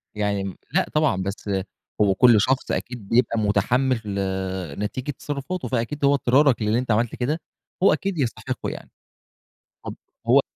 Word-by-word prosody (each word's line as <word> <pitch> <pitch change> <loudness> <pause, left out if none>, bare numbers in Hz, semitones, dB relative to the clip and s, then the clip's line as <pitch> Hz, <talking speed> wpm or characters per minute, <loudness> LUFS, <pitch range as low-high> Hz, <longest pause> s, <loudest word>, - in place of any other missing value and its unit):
يعني 105 -1 0
امم، 95 -1 -5 0.2
لأ - - +3
طبعًا 150 -12 +2
بس 100 +1 -5 0.5
هو 100 -2 +4
كل 115 -1 +6
شخص 130 +5 0
أكيد 120 -5 -4
بيبقى 115 -1 +2
متحمّل 115 +5 +1 0.8
نتيجة 130 +7 -3
تصرفاته 145 +6 -5
فأكيد 130 +4 -1
هو 140 - +5
إضطرارك 135 -1 +3
للي 110 +2 +2
أنت 125 -2 -2
عملت 110 +2 +1
كده، 145 +6 -1 0.4
هو - - +6
أكيد 195 -2 -2
يستحقه 125 -6 -2
يعني، - - -8 1.0
طب - - -5 0.3
هو - - +6
120 Hz, 150 wpm, -23 LUFS, 105-140 Hz, 1.0 s, كل